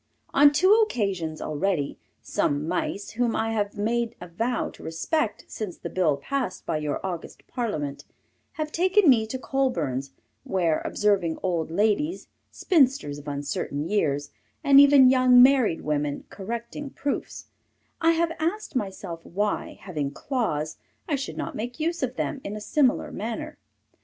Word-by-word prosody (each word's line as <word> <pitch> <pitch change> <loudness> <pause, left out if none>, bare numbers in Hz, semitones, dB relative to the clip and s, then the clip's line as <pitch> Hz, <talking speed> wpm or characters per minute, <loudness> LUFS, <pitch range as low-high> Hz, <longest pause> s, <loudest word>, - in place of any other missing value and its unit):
On 285 +1 +7
two 370 +7 +5
occasions, 195 - -1
already, 155 -1 -1 0.2
some 145 +2 0
Mice, 180 +3 -2
whom 235 0 0
I 225 0 0
have 205 -2 -2
made 235 +2 0
a 180 - -8
vow 225 +9 -2
to - - -15
respect 210 - -2
since 205 -6 -6
the - - -7
bill 160 -6 +2
passed 255 - -3
by - - -1
your 150 -1 -2
august 175 -3 -6
parliament, 155 - -3 0.5
have 310 -1 -4
taken 370 +3 +3
me 225 -5 +5
to 260 - -4
Colburn's, 170 - -1 0.3
where, 170 -5 +1
observing 195 -6 +1
old 170 -4 0
ladies, 215 - 0 0.2
spinsters 265 - +2
of 145 - -13
uncertain 145 +1 -3
years, 145 -8 0 0.3
and 275 0 +7
even 280 -2 +8
young 255 -1 +6
married 255 -10 +4
women, 145 -1 -1
correcting 235 +7 -5
proofs, 280 +1 -4 0.6
I 330 +1 +5
have 330 0 +1
asked 340 +2 -2
myself 190 -6 -4
why, 205 +3 -2
having 150 -8 -3
claws, 155 - -2 0.3
I 305 - +1
should 275 0 -5
not - - -4
make 240 +6 -5
use 335 +2 -1
of 255 -1 -2
them 275 0 -3
in 200 - -5
a - - -5
similar 260 +4 +1
manner. 225 +2 -5
215 Hz, 150 wpm, -26 LUFS, 165-270 Hz, 0.6 s, even